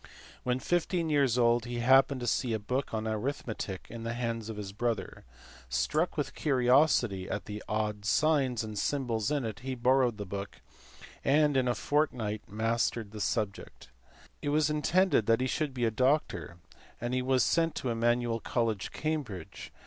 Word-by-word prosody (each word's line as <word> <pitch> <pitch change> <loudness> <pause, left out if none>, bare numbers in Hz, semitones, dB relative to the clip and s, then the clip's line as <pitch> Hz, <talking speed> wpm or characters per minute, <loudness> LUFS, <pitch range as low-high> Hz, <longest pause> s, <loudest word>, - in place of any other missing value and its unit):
When 125 0 0
fifteen 170 +3 0
years 135 -5 +3
old 120 0 +3
he 120 0 -4
happened 130 +2 +4
to - - -3
see 120 0 0
a - - +1
book 125 +6 -2
of 110 -1 -2
arithmetic 110 -3 -3
in 115 0 -8
the 115 +1 -3
hands 115 -2 -3
of 110 - -6
his 100 -2 -5
brother; 115 +1 -3 0.4
struck 155 - 0
with 145 - -2
curiosity 125 -7 +2
at - - -3
the 105 0 -6
odd 105 -1 -1
signs 135 -1 +2
and 110 -2 -5
symbols 120 -6 -1
in 145 -4 0
it 110 -3 -5
he 130 +1 -4
borrowed 125 -1 +2
the 105 - -5
book, 100 +1 -6 0.6
and 145 +1 +3
in 130 -1 +2
a 120 - +1
fortnight 115 -6 0
had 105 - -13
mastered 115 -1 0
the 105 -1 -7
subject. 100 - -3 0.5
It 145 - -2
was 150 +1 +2
intended 150 - +2
that 115 +1 +4
he 130 - 0
should 145 +2 -1
be 125 -2 -1
a 115 - +2
doctor, 110 - 0 0.4
and 120 +1 -3
he 130 - +1
was 130 -1 +2
sent 165 +3 +1
to 130 - -2
Emmanuel 120 0 +1
College, 115 -5 -1
Cambridge. 140 - -4
120 Hz, 175 wpm, -30 LUFS, 110-135 Hz, 0.6 s, happened